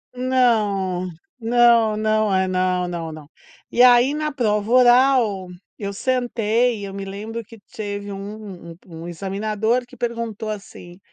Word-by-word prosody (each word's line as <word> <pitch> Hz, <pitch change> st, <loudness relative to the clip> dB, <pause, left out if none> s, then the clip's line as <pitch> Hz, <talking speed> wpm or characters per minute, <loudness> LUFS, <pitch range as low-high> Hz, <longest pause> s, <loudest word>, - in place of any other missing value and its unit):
Não, 210 Hz, -8 st, +1 dB, 0.3 s
não, 235 Hz, -2 st, +4 dB
não 215 Hz, -2 st, +1 dB
é 190 Hz, 0 st, +2 dB
não, 185 Hz, -1 st, 0 dB
não, 170 Hz, -2 st, -5 dB
não, 155 Hz, -2 st, -11 dB, 0.4 s
e 245 Hz, -, +2 dB
aí 250 Hz, +2 st, +6 dB
na 305 Hz, 0 st, -2 dB
prova 215 Hz, -6 st, 0 dB
oral 245 Hz, -5 st, +4 dB, 0.3 s
eu 200 Hz, -2 st, -3 dB
sentei 240 Hz, 0 st, 0 dB
e -, -, -6 dB
eu 195 Hz, -, -7 dB
me 195 Hz, 0 st, -5 dB
lembro 215 Hz, +4 st, -6 dB
que 230 Hz, +2 st, -15 dB, 0.2 s
teve 205 Hz, -1 st, -5 dB
um 195 Hz, -4 st, -9 dB
um 165 Hz, -1 st, -9 dB
examinador 210 Hz, +6 st, -1 dB
que -, -, -16 dB
perguntou 230 Hz, -2 st, -4 dB
assim, 190 Hz, -4 st, -9 dB
215 Hz, 140 wpm, -21 LUFS, 195-240 Hz, 0.4 s, aí